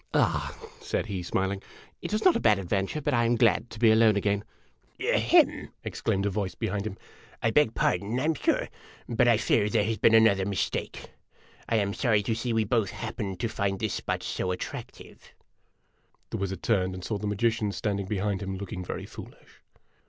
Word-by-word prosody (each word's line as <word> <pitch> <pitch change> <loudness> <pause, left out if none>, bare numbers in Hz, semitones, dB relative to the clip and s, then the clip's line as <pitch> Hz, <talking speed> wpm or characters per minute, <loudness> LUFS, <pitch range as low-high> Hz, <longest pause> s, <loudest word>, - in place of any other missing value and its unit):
"Ah," - - +1 0.2
said 425 - -2
he, 100 -4 -4
smiling, 95 +3 -1 0.4
"it - - -5
was 215 +1 -1
not 370 - +6
a - - +2
bad 105 -3 +4
adventure, 95 - -2
but 145 0 0
I 120 -1 +3
am 120 +1 +2
glad 115 -1 +3
to - - -10
be 110 0 +5
alone 110 -1 +5
again! 100 0 0 0.6
"Ahem!' - - +3
exclaimed 100 +1 -1
a - - +2
voice 95 -2 -2
behind 105 -1 -2
him. 100 - -7 0.5
"I 115 - +3
beg 135 -3 +3
pardon, 100 +7 0
I - - -1
'm 160 +1 +2
sure; - - 0 0.4
but 120 +1 +2
I 115 -2 +5
fear 105 -1 +2
there 110 -1 +2
has 110 0 -2
been 115 - +5
another 110 -4 +5
mistake. 100 -1 -3 0.6
I - - +2
am 100 -2 +1
sorry 110 -4 +2
to 110 - 0
see 115 +2 -2
we 115 -1 +2
both 110 -2 +1
happened 95 -2 -5
to 120 - +1
find 100 -3 -2
this 110 -2 -1
spot - - -3
so 90 - -2
attractive! 90 - -7 0.4
' - - -42
The - - -2
wizard 95 -2 -4
turned 95 -4 +1
and 90 - -8
saw 105 -3 -2
the 105 - -3
magician 110 +1 0
standing 100 -1 -2
behind 100 -1 -1
him, 95 -1 -4
looking 95 -2 -6
very - - -5
foolish. - - -13
105 Hz, 195 wpm, -27 LUFS, 95-115 Hz, 0.6 s, not